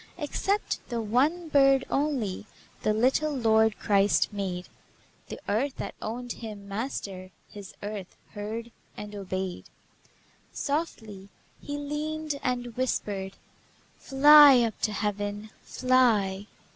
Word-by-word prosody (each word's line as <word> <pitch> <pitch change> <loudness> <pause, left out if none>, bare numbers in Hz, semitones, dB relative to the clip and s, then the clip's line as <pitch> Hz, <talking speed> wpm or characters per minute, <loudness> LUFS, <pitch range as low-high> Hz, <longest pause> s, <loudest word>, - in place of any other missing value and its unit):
Except 390 +6 -1
the 235 -2 -2
one 275 +11 +1
bird 275 -3 +4
only 255 -9 -1 0.3
The 215 - +1
little 260 +8 +2
Lord 220 -2 +3
Christ 200 +1 +2
made; 185 -3 -4 0.6
The - - -7
earth 255 +7 0
that - - -5
owned 240 +3 -5
Him 210 -4 -8
Master, 200 -4 -5 0.2
His 200 -2 -11
earth 205 -3 -6
heard 220 +3 -6 0.3
and 210 0 -8
obeyed. 190 -2 -4 0.9
Softly 220 - -4 0.3
He 290 0 -5
leaned 300 +1 -3
and 245 -2 -2
whispered: 200 -6 -2 0.7
"Fly 285 -1 +8
up 230 -3 -2
to 215 - +1
Heaven! 205 0 -3
Fly!" 220 -6 +2
225 Hz, 110 wpm, -27 LUFS, 205-275 Hz, 0.9 s, Fly